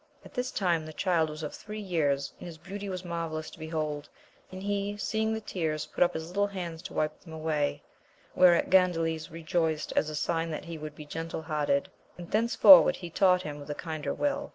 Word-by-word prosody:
At - - -13
this 250 +1 -2
time 175 -5 +1
the 155 - -8
child 165 -2 +1
was 155 +1 -7
of 150 - -4
three 215 0 -7
years, 150 -8 0
and - - -8
his 165 -2 -9
beauty 195 +4 -7
was 185 -1 -5
marvellous 165 -2 -4
to - - -14
behold, 155 -2 -3 0.4
and 185 +1 -7
he, 205 0 -1
seeing 220 +1 0
the 220 - -1
tears, 160 -7 -2
put - - +2
up 175 0 0
his 160 0 -4
little 200 +3 +1
hands 175 -5 -6
to 185 - -9
wipe 155 - -1
them 165 - -13
away, 155 - -1 0.5
whereat 175 -2 +5
Gandales 165 -4 +3
rejoiced 160 -1 -1
as 155 - +2
a 155 - -5
sign 165 +2 -1
that 155 - -5
he 165 -1 -7
would 150 0 -7
be 150 - -9
gentle 165 +1 -5
hearted, 150 -3 0 0.3
and 175 -1 -9
thenceforward 235 +6 +7
he 175 -2 -8
taught 180 0 +4
him 150 -1 -6
with 145 - -10
a 145 - -2
kinder 155 -2 -4
will. 290 0 -1
165 Hz, 210 wpm, -29 LUFS, 155-185 Hz, 0.5 s, thenceforward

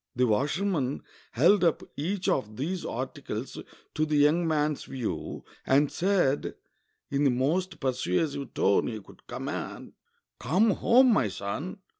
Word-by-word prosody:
The 125 +1 +3
washerman 145 - 0 0.3
held 175 - +4
up 165 -3 +2
each 180 +6 -2
of 110 -5 -1
these 170 +7 -3
articles - - -5 0.3
to 155 - 0
the 155 -1 0
young 150 +4 +4
man's 150 -2 0
view, 125 -4 -5 0.2
and 140 +2 +3
said, 175 -7 +1 0.6
in 140 +1 +1
the 140 - +5
most 155 +10 0
persuasive 135 - -1
tone 100 - +3
he 110 -2 -4
could 100 - -18
command, - - -6 0.5
"Come 190 - +3
home, 245 +5 +5
my 125 - +2
son. 105 - -5
145 Hz, 135 wpm, -28 LUFS, 130-180 Hz, 0.6 s, the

